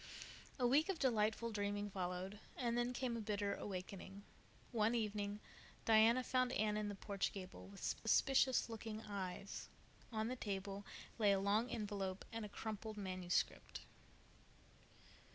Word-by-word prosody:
A 250 - +2
week 290 +8 +5
of 385 - +1
delightful 230 -3 +2
dreaming 205 -1 -1
followed, 185 +2 -3 0.2
and 235 -2 +1
then 240 +1 +2
came 250 -1 -1
a 230 - -2
bitter 205 -1 0
awakening. 195 0 -5 0.5
One 225 0 +3
evening 205 -2 -1 0.5
Diana 225 +3 +6
found 255 0 +2
Anne 210 0 +2
in 210 -1 0
the 205 - -4
porch 200 0 -1
gable, 185 -2 -8
with 195 0 -11
suspicious 260 +3 +4
looking 225 -1 -5
eyes. 195 -1 -4 0.4
On 220 -1 0
the 255 - -1
table 200 -3 -3 0.3
lay 205 -2 +6
a 195 - +3
long 210 +5 +2
envelope 200 -4 -2
and 225 -1 -2
a 210 - -5
crumpled 215 +1 -4
manuscript. 185 -3 -1
210 Hz, 140 wpm, -40 LUFS, 200-230 Hz, 0.5 s, Diana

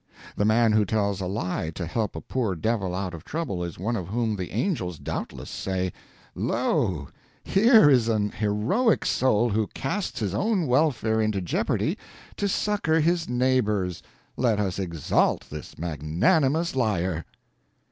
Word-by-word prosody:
The 100 - +1
man 110 +1 +4
who 105 0 +4
tells 100 -1 0
a 90 - -2
lie 90 -4 -2
to 90 - -3
help 105 +5 -2
a - - -5
poor 115 -8 -2
devil 95 0 -1
out 95 -1 -3
of 80 - -8
trouble 145 - -3
is 85 -2 -6
one 110 +7 -1
of 90 -6 -4
whom 110 +1 -1
the 90 -3 -4
angels 95 - -2
doubtless - - -5
say, 95 -2 -2 0.4
"Lo, 75 -7 0 0.4
here 220 - +6
is 125 -5 +4
an 105 -2 +1
heroic 110 - +1
soul 120 -2 +2
who 110 0 +1
casts 160 +7 -3
his 100 -5 -2
own 200 - +1
welfare 125 -5 +2
into 110 -2 0
jeopardy 90 -3 -1 0.4
to 205 - 0
succor 195 -5 +1
his 165 0 +1
neighbor's; 120 -8 +1 0.3
let 115 -5 +1
us 100 -2 -1
exalt 85 -5 0
this 75 0 -8
magnanimous 130 - +1
liar." 95 -9 0
110 Hz, 150 wpm, -25 LUFS, 95-130 Hz, 0.4 s, here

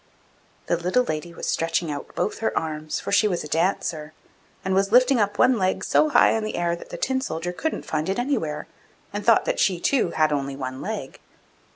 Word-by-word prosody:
The 170 - +1
little 180 +9 +1
lady 170 -5 -4
was - - -7
stretching 165 0 0
out 145 -1 -7
both 210 - -1
her 225 - -1
arms, 155 -1 -3
for - - -5
she 205 +1 +4
was 180 -4 -1
a - - -6
Dancer, 160 -2 -1 0.5
and 190 - 0
was 195 +1 +2
lifting 255 +2 +5
up 205 -1 0
one 250 -3 +4
leg 185 0 0
so 310 - +3
high - - +5
in 220 - 0
the 215 - -3
air 170 0 0
that 170 - -12
the - - -6
Tin 260 0 0
soldier 175 -7 -3
couldn't 320 - -3
find 155 +2 -2
it 195 - 0
anywhere, 240 - -1 0.5
and 205 0 -3
thought 230 +1 +4
that - - -1
she, 185 -3 +2
too, 265 +8 +2
had 155 -1 +2
only 140 -1 -2
one 130 -1 -5
leg. - - -5
175 Hz, 215 wpm, -24 LUFS, 155-220 Hz, 0.5 s, lifting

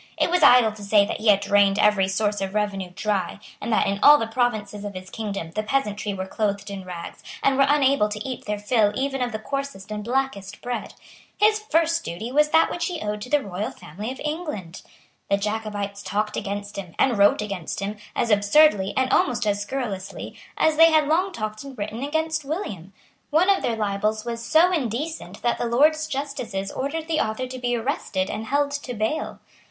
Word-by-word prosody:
It - - +1
was 360 -1 +2
idle 250 -6 +7
to 210 -1 -11
say 200 0 +4
that - - -4
he 220 - -3
had 200 -1 +6
drained 200 -1 +3
every 205 -2 +4
source 205 +1 0
of 195 +1 -3
revenue 200 -3 -1
dry, 200 -2 -1 0.2
and - - -3
that, 220 - +3
in 200 0 -1
all 295 +1 +9
the 225 - -1
provinces 220 -3 -1
of 205 -2 -6
his 185 0 -8
kingdom, 200 -7 -4
the 215 - -2
peasantry 215 -3 -1
were 190 -1 -4
clothed 200 0 -2
in 195 -1 -6
rags, 175 -2 -8 0.2
and 275 - +3
were 275 0 +4
unable 275 -6 +3
to 210 +3 -5
eat 255 - -6
their 210 0 -2
fill 205 0 +2
even 270 0 -1
of 245 -1 -1
the 215 - -3
coarsest 275 -4 -5
and 210 0 -4
blackest 240 -5 -2
bread. 245 0 -4 0.4
His 430 +1 +4
first 335 -4 +1
duty 215 +8 -5
was 300 +2 +3
that 320 +1 +4
which 340 -1 -2
he 350 -3 -4
owed 210 -3 -3
to 250 - -7
the 295 0 +2
royal 195 +1 -3
family 205 +10 -7
of 265 - -9
England. 300 - -4 0.5
The 200 - +3
Jacobites 205 -1 -3
talked 210 +1 -2
against 205 +1 -4
him, 180 -4 -7
and 260 -3 +3
wrote 205 +1 +4
against 195 -6 -5
him, 205 +2 -4 0.2
as 230 - 0
absurdly, 205 0 +4
and 260 0 +2
almost 240 -3 +2
as 205 -1 0
scurrilously, 205 -4 -5 0.2
as 315 -1 +2
they 330 +1 +8
had 310 -2 +3
long 360 +5 +2
talked 215 -7 -5
and 275 -2 -10
written 210 +3 -4
against 315 +2 -1
William. 215 - -5 0.4
One 340 +6 +4
of 390 - +2
their 230 - 0
libels 215 +1 -1
was 230 -1 -4
so 320 +8 +4
indecent 260 - -3
that 240 - +1
the - - 0
Lords 310 +6 +3
justices 265 -9 -4
ordered 315 +4 -3
the 320 -1 0
author 220 +4 -1
to 255 0 -7
be 245 -1 0
arrested 225 -6 -2
and 220 +1 -5
held 285 +1 +1
to 285 -4 -5
bail. 220 +9 -2
220 Hz, 205 wpm, -24 LUFS, 205-280 Hz, 0.5 s, all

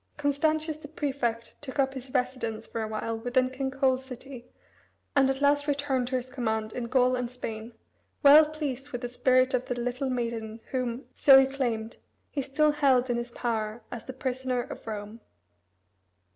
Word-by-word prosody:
Constantius 305 +2 0
the 310 - -10
prefect 265 -6 -2
took 280 -1 -7
up 270 -1 +2
his 260 -1 -8
residence 250 -4 -2
for 230 - -4
a 220 - -2
while 225 +1 -3
within 255 +2 +1
King 265 +1 -2
Coel's 265 -1 +1
city, 255 -1 -10 0.7
and 270 -1 +5
at 270 +1 -1
last 285 +1 +3
returned 280 -3 0
to 260 - -2
his 250 -1 -1
command 220 -4 -2
in 245 - -3
Gaul 255 +1 +3
and 250 -1 -2
Spain, 230 -2 -6 0.5
well 290 +2 +10
pleased 290 -3 -4
with 245 - -4
the 245 - -2
spirit 255 +1 +3
of 255 0 0
the 245 -1 -2
little 250 +3 -2
maiden 230 -3 -3
whom, 255 0 -2
so 270 -2 +8
he 270 - +5
claimed, 240 -5 -2 0.3
he 285 - -1
still 300 +3 +2
held 265 -4 +3
in 240 - 0
his 240 0 -3
power 225 -2 -3
as 240 -2 -7
the 260 - -6
prisoner 260 -1 -2
of - - -10
Rome. 215 +1 -6
255 Hz, 180 wpm, -28 LUFS, 235-275 Hz, 0.7 s, well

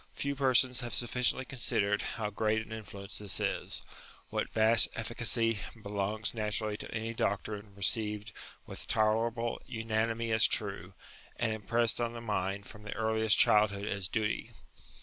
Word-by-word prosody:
Few 140 0 -1
persons 130 -2 +3
have 120 -4 -2
sufficiently 125 +3 +1
considered 105 -5 0
how 105 -2 -3
great 110 +1 0
an - - -15
influence 100 -3 -7
this 105 -2 -1
is; - - -2 0.5
what - - -1
vast 110 -1 +5
efficacy 115 -1 +2 0.2
belongs 105 +1 -2
natu 110 -1 -1
rally 105 -1 -2
to - - -7
any 115 0 -3
doctrine 105 -1 -2
received 105 +1 +1 0.3
with - - -7
tolerable 115 +1 +1
unanimity 115 0 -1
as 110 0 +5
true, 100 -4 -1 0.4
and 115 -2 0
impressed 115 +2 +1
on 120 0 -1
the 120 - -6
mind 100 -3 -2
from 105 - -11
the 105 - -6
earliest 110 -1 +2
childhood 105 -1 +4
as 100 -3 -1
duty. 105 +1 -1
110 Hz, 150 wpm, -31 LUFS, 105-115 Hz, 0.5 s, vast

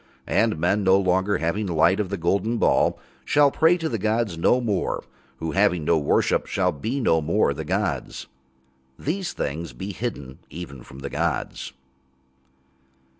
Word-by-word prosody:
And 110 -6 +1
men, 95 +6 +1
no 95 0 +5
longer 95 +1 +1
having 95 +6 -1
light 85 +3 +3
of 100 -3 -1
the 100 - -3
golden 100 +7 0
ball, - - +2 0.3
shall 145 -1 +4
pray 165 +4 +4
to 165 -2 -2
the 115 -7 -2
gods 110 -2 0
no 105 +9 +3
more, 105 -7 -1 0.3
who, 80 +3 -3
having 90 -4 +2
no 85 0 +3
worship, 70 - +1
shall - - +1
be 110 - -3
no 80 -10 +2
more 80 0 +1
the 80 +3 -5
gods. 90 -6 -2 0.7
These 175 +4 -3
things 75 0 -4
be 95 +12 -6
hidden 75 - -5
even 70 -5 -8
from 65 +2 -12
the 70 - -5
gods. - - -2
95 Hz, 160 wpm, -24 LUFS, 80-110 Hz, 0.7 s, no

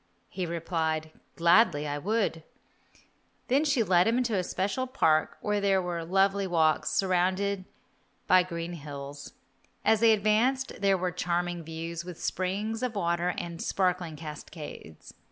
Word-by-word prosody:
He 185 -2 -3
replied, 160 -2 -2 0.2
"Gladly 170 -2 +4 0.2
would 205 0 0 1.1
I." 265 +3 +4
She 290 -5 +2
then - - -9
led 175 +1 +5
him 230 +2 +2
into 240 -4 0
a 185 - +1
special 200 +9 -2
park 160 - +2
where 210 -1 0
there 195 -1 +3
were 175 -2 -3
lovely 195 +3 +2
walks, 160 -4 +2
surrounded 185 +3 +1 0.6
by 185 -1 +6
green 170 -1 -5
hills. 140 -2 -8 0.5
As 220 - +4
they 225 0 +6
advanced 220 +6 +2
there 195 -1 +3
were 180 0 -1
charming 175 0 -2
views, 165 +1 -5
with 180 -2 -9
springs 205 +5 -2
of 250 -3 -2
water 175 -1 0
and 170 -1 -5
sparkling 180 -4 0
cascades. 150 - -9
180 Hz, 140 wpm, -28 LUFS, 165-200 Hz, 1.1 s, by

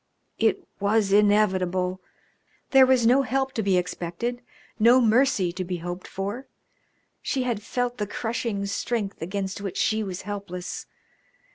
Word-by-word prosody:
It - - +1
was 200 0 +2
inevitable; 185 -3 +2 0.7
there 265 -1 +7
was 255 -3 +4
no 255 +4 +5
help 265 0 -1
to 225 - -1
be 195 -3 +2
expected, 180 +7 -3 0.4
no 235 +4 +6
mercy 225 -6 +3
to 185 +2 -4
be 180 0 -3
hoped 175 +2 -6
for. 205 +7 -5 0.7
She 265 -3 -1
had 235 -4 -2
felt 245 +2 -2
the 210 - -1
crushing 225 -2 -2
strength 200 0 -3
against 190 +3 -3
which 195 -2 -5
she 220 0 +1
was 190 -3 -5
helpless. 195 -3 -6
205 Hz, 140 wpm, -25 LUFS, 185-240 Hz, 0.7 s, there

